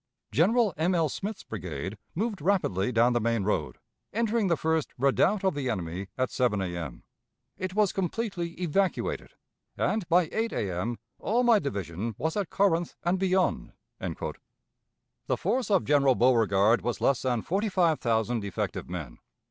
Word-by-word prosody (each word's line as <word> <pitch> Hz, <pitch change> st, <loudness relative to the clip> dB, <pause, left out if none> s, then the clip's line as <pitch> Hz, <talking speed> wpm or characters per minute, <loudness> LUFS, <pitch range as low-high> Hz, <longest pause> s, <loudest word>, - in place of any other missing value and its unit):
General 210 Hz, -, +3 dB
M. 175 Hz, +4 st, +2 dB
L. 165 Hz, -3 st, +2 dB
Smith's 200 Hz, +7 st, -5 dB
brigade 90 Hz, -2 st, -5 dB, 0.2 s
moved 210 Hz, -1 st, -2 dB
rapidly 145 Hz, -, +1 dB
down 120 Hz, +1 st, +4 dB
the 120 Hz, -, +1 dB
main 115 Hz, -2 st, +1 dB
road, 95 Hz, -6 st, -1 dB, 0.3 s
entering 225 Hz, -1 st, +1 dB
the 170 Hz, -3 st, +2 dB
first 160 Hz, -1 st, 0 dB
redoubt 140 Hz, +10 st, +2 dB
of 190 Hz, -, +2 dB
the 140 Hz, -3 st, -2 dB
enemy 95 Hz, -3 st, -3 dB
at 130 Hz, 0 st, 0 dB
7 120 Hz, -5 st, +1 dB
A.M. 85 Hz, -3 st, -4 dB, 0.5 s
It 185 Hz, 0 st, -4 dB
was 210 Hz, -3 st, +3 dB
completely 185 Hz, -3 st, -3 dB
evacuated, 185 Hz, +2 st, -1 dB, 0.4 s
and 210 Hz, -6 st, 0 dB
by 175 Hz, -1 st, +4 dB
8 225 Hz, +1 st, -1 dB
A.M. 100 Hz, +5 st, -2 dB, 0.2 s
all 235 Hz, +4 st, +1 dB
my 235 Hz, -3 st, +5 dB
division 100 Hz, -, -4 dB
was 160 Hz, +1 st, -1 dB
at 200 Hz, -4 st, -1 dB
Corinth 175 Hz, -4 st, +1 dB
and 180 Hz, +2 st, +1 dB
beyond." 190 Hz, 0 st, +1 dB, 0.3 s
The -, -, -7 dB
force 255 Hz, -2 st, 0 dB
of 195 Hz, -4 st, +3 dB
General 140 Hz, -3 st, +4 dB
Beauregard 115 Hz, -3 st, +4 dB
was 120 Hz, -, -2 dB
less 135 Hz, -3 st, +2 dB
than 125 Hz, -4 st, 0 dB
forty 200 Hz, +5 st, 0 dB
five 170 Hz, -5 st, +2 dB
thousand 115 Hz, -1 st, 0 dB
effective 100 Hz, -3 st, -3 dB
men. 80 Hz, -9 st, -6 dB
150 Hz, 155 wpm, -28 LUFS, -, 0.5 s, my